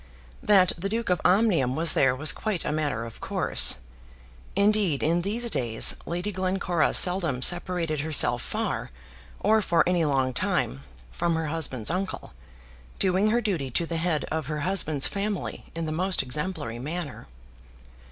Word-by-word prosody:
That 200 -7 +4
the 195 +3 -3
Duke 225 -2 -2
of 180 - 0
Omnium 180 - +2
was 160 0 +3
there 135 -2 +3
was 150 +3 +3
quite 210 -6 -2
a - - -1
matter 145 -7 -2
of 115 - -11
course. - - +2 0.8
Indeed, 200 -6 +2
in 170 +3 +1
these 220 +6 -2
days 115 -3 +2
Lady 175 +5 -3
Glencora 185 -3 0
seldom 170 -8 +3
separated 175 -3 +1
herself 155 0 +3
far, - - -3 0.5
or 220 +2 +3
for 170 -4 +2
any 175 -2 +2
long 135 -3 0
time, 65 - -1 0.3
from 170 - -1
her 160 -1 -2
husband's 145 -6 -1
uncle, 185 +2 -4 0.6
doing 190 +2 +2
her 240 +2 +1
duty 175 - -2
to 165 +7 -1
the 165 0 -4
head 160 -2 -1
of 160 -4 -3
her 150 -1 -3
husband's 155 -5 +2
family 200 -1 -4
in 165 0 -3
the 155 - -3
most 180 +2 +1
exemplary 130 -3 -3
manner. 150 - -6
170 Hz, 155 wpm, -26 LUFS, 150-190 Hz, 0.8 s, That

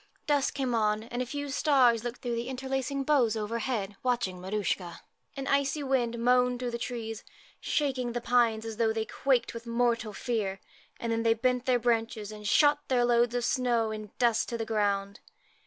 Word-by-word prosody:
Dusk 290 -2 +1
came 260 -3 -1
on, 215 -1 +1
and 240 +2 -4
a 250 - -3
few 285 +2 -4
stars 260 -5 +3
looked 245 +2 -6
through 240 -1 -2
the 235 +1 -3
interlacing 265 +1 -2
boughs 260 -6 +3
overhead, 215 -1 -2
watching 235 -8 -1
Maruschka. 190 -3 -2 0.4
An 270 - -4
icy 280 +1 +1
wind 245 -3 0
moaned 250 +1 +3
through 250 -1 -3
the 235 - -4
trees, 230 -2 -5 0.4
shaking 255 -5 -1
the 240 - -1
pines 230 -2 +2
as 225 -1 -6
though 225 -1 +2
they 220 0 -2
quaked 260 -1 0
with 230 0 -8
mortal 235 -2 +1
fear, 205 -3 -2 0.4
and 230 - -2
then 225 0 0
they 225 0 +3
bent 250 +2 0
their 255 -1 +4
branches 225 -3 -1
and 210 -1 -7
shot 290 +4 +4
their 245 -2 +2
loads 240 0 +3
of 245 -1 0
snow 240 -4 +1
in 215 -1 -6
dust 235 -2 +2
to 235 - -3
the 225 - -3
ground. 200 -2 -1
235 Hz, 190 wpm, -29 LUFS, 220-255 Hz, 0.4 s, their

